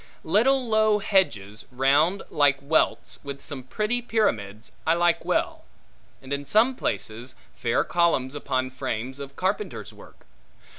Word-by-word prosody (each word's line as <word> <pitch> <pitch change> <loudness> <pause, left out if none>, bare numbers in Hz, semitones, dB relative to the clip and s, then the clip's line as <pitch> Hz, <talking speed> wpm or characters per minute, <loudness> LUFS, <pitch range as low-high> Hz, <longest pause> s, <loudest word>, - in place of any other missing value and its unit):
Little 250 +9 +2
low 215 -1 +3
hedges, 115 - 0
round, 140 +9 +2
like 145 -3 +3
welts, 145 +3 0
with 140 -1 -6
some 140 -3 -5
pretty 215 - -2
pyramids, 115 - -1 0.2
I 165 - +4
like 175 0 +2
well; - - -1 0.6
and 135 +1 -5
in 140 0 -2
some 220 - +3
places, 120 - -4 0.2
fair 115 -1 +1
columns 165 -7 +1
upon 130 -3 -2
frames 130 0 -4
of 140 0 -8
carpenter's 190 - -3
work. - - -17
145 Hz, 135 wpm, -25 LUFS, 130-205 Hz, 0.6 s, I